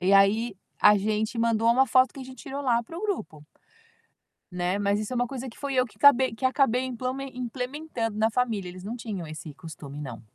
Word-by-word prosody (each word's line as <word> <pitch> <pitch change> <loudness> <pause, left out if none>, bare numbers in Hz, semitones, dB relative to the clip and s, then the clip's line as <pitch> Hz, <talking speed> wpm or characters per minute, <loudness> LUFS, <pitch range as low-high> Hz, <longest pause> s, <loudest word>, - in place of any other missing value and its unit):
e 185 +2 +2
aí, 200 +2 +4 0.2
a 210 0 +7
gente 215 +3 -1
mandou 230 0 +3
uma 260 +3 +4
foto 255 -1 +4
que 275 - -8
a - - -6
gente 260 0 -11
tirou 280 +1 -5
lá 240 -3 +2
para 330 +8 -10
o - - -7
grupo. 160 - -3 1.1
Né, 180 +3 -1
mas 200 0 +2
isso 215 +3 -4
é - - -1
uma 245 0 +1
coisa 265 -1 -5
que 230 - -12
fui 280 -1 -4
eu 255 - +3
que - - -20
cabei 265 -4 +6
que 260 - -8
acabei 260 -2 +3
implamen 260 +2 -4
implementando 250 -2 -4
na 220 +1 +4
família, 220 -6 0
eles 180 +1 -9
não 215 +5 -5
tinham 215 -7 -5
esse 155 -1 -8
costume, 145 -1 -9
não. 125 -6 -7
230 Hz, 220 wpm, -27 LUFS, 200-260 Hz, 1.1 s, a